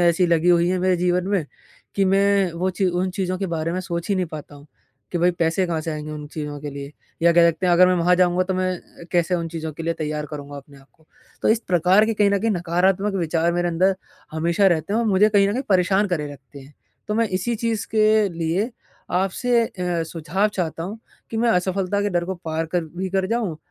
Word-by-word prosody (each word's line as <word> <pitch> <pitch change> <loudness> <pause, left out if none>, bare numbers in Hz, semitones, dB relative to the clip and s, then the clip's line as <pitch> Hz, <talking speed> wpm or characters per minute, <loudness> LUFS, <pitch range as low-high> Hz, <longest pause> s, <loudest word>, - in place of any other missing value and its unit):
ऐसी 175 +1 +3
लगी 170 0 +2
हुई 175 0 +4
हैं 185 - 0
मेरे 185 0 +2
जीवन 180 +1 0
में 195 -5 +1 0.5
कि 195 - +3
मैं 195 -1 +3
वो 180 +3 -1
ची 190 +1 0
उन 180 +1 0
चीज़ों 185 -1 -2
के 195 - -2
बारे 160 +1 -2
में 185 - -2
सोच 170 -2 -4
ही 200 - +2
नहीं 185 -1 0
पाता 155 -2 -9
हूँ 145 0 -15 0.5
कि 175 - 0
भई 175 +1 +4
पैसे 170 +2 0
कहाँ 165 -2 -2
से 165 - -4
आएँगे 155 0 -6
उन 150 -1 -7
चीज़ों 150 -1 -6
के 145 0 -6
लिए? 140 +1 -8 0.3
या 170 0 +5
कह 170 0 +6
सकते 165 +3 -3
हैं 175 - +3
अगर 180 +1 +6
मैं 185 - +3
वहाँ 180 +1 +3
जाऊँगा 180 0 +3
तो 190 0 -2
मैं 185 0 0
अ, 170 - -16
कैसे 175 0 +2
उन 170 -1 -2
चीज़ों 160 -1 -5
के 160 - -8
लिए 165 0 -1
तैयार 150 -2 -3
करूँगा 145 -1 -8
अपने 140 0 -13
आप 135 - -20
को? 160 -1 -29 0.4
तो - - +2
इस 220 - +4
प्रकार 185 +4 +4
के 225 - -1
कहीं 205 -1 +3
न 200 - +2
कहीं 225 +3 0
नकारात्मक 185 +2 +1
विचार 170 -1 0
मेरे 175 0 0
अंदर 185 +3 +2 0.4
हमेशा 170 +5 +2
रहते 175 +2 +1
हैं 225 - +2
और 235 - 0
मुझे 205 +1 +4
कहीं 200 -2 +3
न 205 - 0
कहीं 255 - -2
परेशान 190 +2 +3
करे 160 -5 -1
रखते 140 +1 -14
हैं। 135 +2 -16 0.3
तो 210 - -1
मैं 230 -1 +1
इसी 190 +6 -1
चीज़ 230 -2 -2
के 215 -1 +4
लिए 170 +6 -1 0.5
आपसे 230 +6 +1
अ, - - -12 0.3
सुझाव 165 +5 -1
चाहता 170 -5 -3
हूँ, 200 +6 -6 0.3
कि 225 - -4
मैं 235 +1 +2
असफलता 190 +1 0
के 205 - 0
डर 175 -2 0
को 190 +2 -3
पार 160 0 -2
कर 175 -2 +1
भी 190 +1 -2
कर 190 0 0
जाऊँ 225 -9 -1
180 Hz, 245 wpm, -22 LUFS, 165-195 Hz, 0.5 s, कह